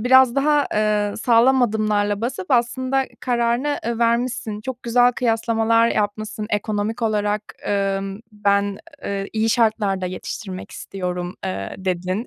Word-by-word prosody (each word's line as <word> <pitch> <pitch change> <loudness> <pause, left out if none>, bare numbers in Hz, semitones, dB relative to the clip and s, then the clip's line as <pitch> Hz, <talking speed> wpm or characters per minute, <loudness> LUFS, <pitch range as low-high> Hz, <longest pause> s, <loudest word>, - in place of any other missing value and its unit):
biraz 255 +1 +6
daha, 290 +1 +3
eee, 210 -1 +1
sağlam 245 +3 +4
adımlarla 210 -2 +1
basıp 235 -5 -4
aslında 260 +2 +2 0.2
kararını, 245 +4 0
eee, 235 0 -2
vermişsin, 235 -2 0
çok 250 +2 -6
güzel 245 +1 +4
kıyaslamalar 230 -1 +2
yapmışsın, 215 0 -2
ekonomik 210 +2 -1
olarak, 210 -1 0 0.2
emm, 195 0 -1
"Ben, 200 -1 +1 0.3
eee, 195 0 -2
iyi 220 0 +1
şartlarda 210 -5 +1
yetiştirmek 185 +1 -6
istiyorum" 180 -2 -5
eee, 95 +1 -4
dedin. 185 +4 -2
215 Hz, 120 wpm, -22 LUFS, 200-240 Hz, 0.3 s, biraz